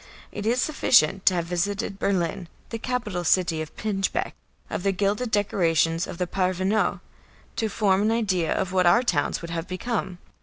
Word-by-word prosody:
It 205 +1 -5
is 240 +2 +2
sufficient 245 - +3
to 185 - +6
have 170 -1 -1
visited 195 +3 -2
Berlin, 180 -1 -1 0.2
the 230 - -4
capital 220 -8 -2
city 170 -2 +2
of 155 - -8
pinchbeck, 200 -2 -2 0.3
of - - -4
the 195 +1 +1
gilded 205 +5 0
decorations 165 -5 +1
of - - -7
the 180 - 0
parvenu, 185 +3 0 0.6
to 220 - 0
form 200 -2 +2
an 215 +2 +2
idea 190 -8 0
of 185 0 -1
what 185 -1 +3
our 235 +8 +5
towns 170 -7 0
would 170 - -6
have 165 0 -4
become. 185 0 -3
190 Hz, 175 wpm, -25 LUFS, 175-210 Hz, 0.6 s, to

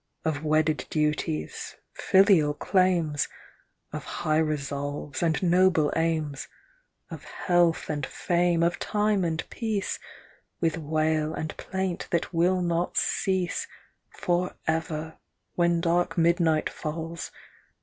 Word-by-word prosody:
Of 155 -1 -1
wedded 155 0 +1
duties, 150 - -2 0.2
filial 190 -7 +4
claims, 175 -5 +2 0.7
Of - - -4
high 155 -2 0
resolves 145 -2 -2
and 165 +1 +1
noble 175 -4 +4
aims; 160 -4 -1 0.6
Of - - -7
health 175 -2 +1
and 150 -2 -3
fame, 175 +3 +1
of 170 +1 +1
time 210 -2 +1
and 160 -1 -2
peace, 220 -4 -2 0.6
With 165 -1 0
wail 155 0 0
and 155 - -4
plaint 190 -2 -3
that 170 +1 -1
will 180 +2 +2
not 170 0 -1
cease 185 -3 0 0.4
For 175 +1 -1
ever, 160 0 -2 0.3
when 170 -1 +2
dark 175 0 +1
midnight 170 -2 +3
falls. 165 +1 -5
165 Hz, 110 wpm, -27 LUFS, 155-175 Hz, 0.7 s, filial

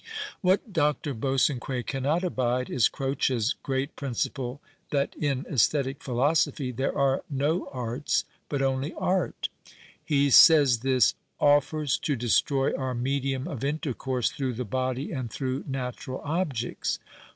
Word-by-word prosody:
What 190 +2 +1
Dr. 150 -3 +1
Bosanquet 130 0 0
cannot 145 +6 0
abide 125 -7 0
is 125 - +3
Croec's 135 -3 0
great 135 +1 -2
principle 130 0 -3 0.3
that 140 -1 0
in 140 -1 -1
aesthetic 135 - +1
philosophy 135 +1 +1
there 130 +4 -2
are 135 -1 +2
no 150 +5 0
arts 125 +2 -1 0.2
but 140 -2 -1
only 135 +4 -1
art. 185 -1 -1 0.5
He 140 -2 +2
says 145 -6 +8
this 130 -2 +3 0.2
" - - -48
offers 145 0 +3
to 150 -3 -1
destroy 135 +3 +2
our 130 -1 -2
medium 135 +2 -1
of 140 -9 -5
intercourse 135 -4 -1
through 135 -5 -2
the 125 +2 -3
body 130 +5 -2
and 130 -6 -3
through 130 +3 -3
natural 130 -1 -4
objects." 145 -7 -2
135 Hz, 130 wpm, -27 LUFS, 130-145 Hz, 0.5 s, says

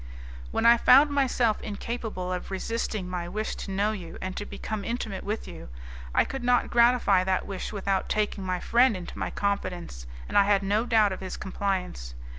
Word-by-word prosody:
"When - - -1
I 235 0 +8
found 275 +5 +6
myself 250 -5 +1
incapable 210 -3 -4
of 180 - -5
resisting 205 0 -3
my 175 -1 -4
wish 215 +4 -3
to - - -7
know 200 +2 +1
you 185 -6 -7
and 185 0 -5
to 205 - -5
become 215 -2 -5
intimate 225 -4 -4
with 210 +2 -4
you, - - -10 0.5
I - - +4
could 270 -2 -6
not 245 0 +2
gratify 235 -5 +4
that 190 -1 0
wish 195 -2 -5
without 195 -2 -1
taking 210 -2 -1
my 185 -1 -2
friend 240 0 +3
into 175 - -8
my - - -2
confidence, 180 - -3 0.2
and - - +3
I 200 - +5
had 200 -1 +3
no 210 +4 +1
doubt 220 -4 +4
of 190 - -4
his 185 - -5
compliance. 185 - -3
200 Hz, 190 wpm, -27 LUFS, 185-230 Hz, 0.5 s, I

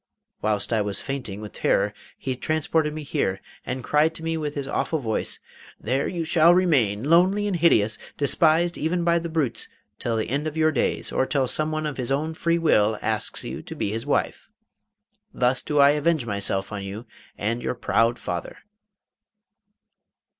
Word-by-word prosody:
Whilst 105 +1 0
I 110 - +2
was 100 -1 -1
fainting 125 -8 -5
with 105 - -7
terror - - +1 0.2
he 130 -1 -3
transported 155 +2 0
me 155 0 -6
here, 95 -8 -1 0.2
and 130 0 -4
cried 150 +4 +2
to 160 - -7
me 165 0 -1
with 150 -2 -3
his 140 -2 -3
awful 160 - -1
voice: 115 -7 -2 0.4
"There 140 - -1
shall 165 0 +5
you 175 - +7
remain, 125 - +2
lonely 180 +7 +4
and 200 -3 0
hideous, 110 -11 +3 0.2
despised 165 +4 +2
even 170 +3 0
by 170 0 +3
the 170 0 -5
brutes, 155 -7 -1 0.3
till 115 -2 -1
the 110 - -1
end 145 +5 -1
of 155 +1 -5
your 155 0 +3
days, - - -1
or 130 - +1
till 135 -2 +1
some 155 +4 -1
one 155 0 -2
of 150 -2 -3
his 125 -1 -3
own 155 +4 0
free 170 +1 +1
will 110 -10 +3
asks 110 -1 -2
you - - -5
to - - -9
be 100 - -2
his 115 +1 -4
wife. - - -1 0.9
Thus 125 +1 +2
do 150 - -2
I 140 0 +7
avenge 150 -2 +1
myself 100 -2 -1
on 105 -1 -4
you 100 +4 -7 0.3
and 115 +3 -1
your - - -2
proud 115 0 +1
father." 85 -1 -5
140 Hz, 180 wpm, -24 LUFS, 110-160 Hz, 0.9 s, you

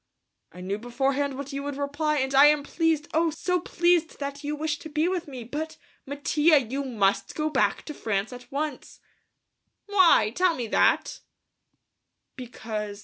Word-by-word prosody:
"I 180 - -11
knew 195 +3 -3
beforehand 270 +3 -1
what 280 0 -7
you 275 - -3
would 285 -1 -5
reply 290 +2 -1
and 265 0 -1
I 275 +2 +8
am 295 -1 +3
pleased, 320 0 0
oh, 330 +1 +2
so 360 +3 -1
pleased 345 -1 +1
that 280 0 -6
you 295 +1 -2
wish 300 0 -2
to 315 - -9
be 310 +2 0
with 360 -2 -2
me, 260 -4 -7
but, 300 +7 -5 0.3
Mattia, 295 +3 +3
you 270 +3 -4
must 210 -7 0
go 310 0 -1
back - - +1
to 300 - -6
France 215 -2 -2
at 245 0 -12
once!" 290 -1 -4 0.9
"Why? 370 - +4
Tell 360 -2 +2
me 245 - -3
that." - - +2 1.2
"Because.... 220 -5 -6
285 Hz, 165 wpm, -26 LUFS, 250-315 Hz, 1.2 s, I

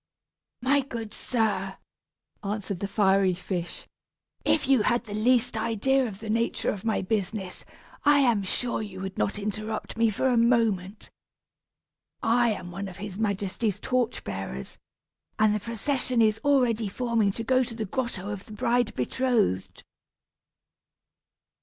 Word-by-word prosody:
"My 280 +3 +4
good 230 -5 -6
sir," 200 -5 -1 0.7
answered 200 -2 -3
the 200 - -2
fiery 195 -2 +3
fish, 175 -1 -4 0.6
"if - - +2
you 265 -4 +5
had 240 +3 +2
the 210 -3 -8
least 240 +3 +2
idea 235 +4 +1
of 205 -1 -8
the 220 - -6
nature 230 +1 +1
of 195 - -6
my 220 -3 0
business, 195 -1 -2 0.4
I 290 0 +6
am 235 -6 +3
sure 235 +5 0
you 200 -3 -7
would 190 0 -5
not 200 - 0
interrupt 215 +2 -4
me 230 0 +4
for 215 +5 -2
a 250 -2 +3
moment. 225 -5 +1 1.1
I 235 +1 +4
am 185 -5 -4
one 195 +3 -5
of 185 -1 -9
his 200 0 -6
majesty's 205 0 -1
torch 250 0 0
bearers, 95 -10 -6 0.6
and 215 -1 +4
the 210 - 0
procession 240 +3 -1
is 220 -1 +3
already 245 -7 +3
forming 230 -2 +1
to 230 - -4
go 255 +2 +3
to 235 -2 -7
the 220 -1 -3
grotto 210 -3 -3
of 200 -1 -6
the 215 - -10
bride 235 +2 +1
betrothed." 125 - 0
215 Hz, 145 wpm, -27 LUFS, 195-235 Hz, 1.1 s, I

